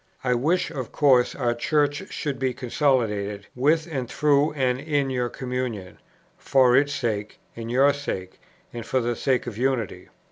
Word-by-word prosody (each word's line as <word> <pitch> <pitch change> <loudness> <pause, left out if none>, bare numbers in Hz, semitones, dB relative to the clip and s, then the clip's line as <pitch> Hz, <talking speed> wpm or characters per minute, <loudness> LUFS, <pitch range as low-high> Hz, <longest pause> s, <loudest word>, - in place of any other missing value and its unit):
I 125 -1 +2
wish 155 +10 +1
of 130 -4 -5
course 130 -5 +3
our 120 -3 0
Church 145 +4 0
should 140 -4 -3
be 130 -2 -1
consolidated, 115 -6 0
with 155 +5 +2
and 135 -8 -4
through 150 0 +2
and 130 -3 0
in 145 -2 -1
your 125 -1 -1
communion, 125 -7 -5 0.4
for 130 -2 +4
its 145 +2 +3
sake, 110 -6 -3 0.2
and 115 0 -6
your 135 +4 +4
sake, 95 -10 -5 0.3
and 120 -1 -5
for 130 - 0
the 120 -1 -1
sake 130 +1 0
of 115 -3 -6
unity. 125 -5 -1
130 Hz, 165 wpm, -24 LUFS, 120-140 Hz, 0.4 s, for